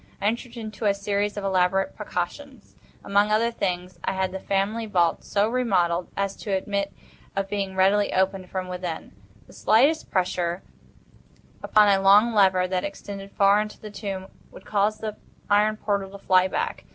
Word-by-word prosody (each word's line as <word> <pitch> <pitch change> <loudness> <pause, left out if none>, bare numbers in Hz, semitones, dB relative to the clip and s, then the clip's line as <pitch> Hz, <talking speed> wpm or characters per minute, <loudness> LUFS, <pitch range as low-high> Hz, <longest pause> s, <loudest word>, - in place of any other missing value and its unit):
I 200 - -4
entered 235 +2 -2
into 220 -1 -6
a 200 -1 +3
series 205 +1 -1
of 205 - -3
elaborate 190 0 +1
precautions. 215 +6 -6 0.3
Among 200 +1 +2
other 225 +2 +2
things, 180 -4 -3
I - - -1
had 190 -1 -1
the 190 - -5
family 200 +4 -1
vault 175 -5 +1
so 205 +1 +1
remodelled 185 -8 +1
as 200 0 -1
to 205 - -6
admit 200 +1 -2 0.4
of 195 0 -1
being 195 -2 -2
readily 195 +2 +3
opened 190 -1 0
from 185 -1 -4
within. 180 -3 -5 0.3
The - - -17
slightest 280 +9 +3
pressure 180 -1 -1 1.0
upon 210 -1 +4
a 195 -1 +3
long 205 +4 +6
lever 190 -3 +4
that 185 0 -1
extended 200 0 -7
far 200 +1 +4
into 210 0 -7
the 215 - -9
tomb 195 -2 -5 0.2
would - - -14
cause 210 +1 +1
the 215 -1 -5 0.3
iron 210 +1 +3
portal 200 -2 -1
to 200 - -10
fly 185 0 +5
back. - - -3
200 Hz, 170 wpm, -25 LUFS, 190-210 Hz, 1.0 s, long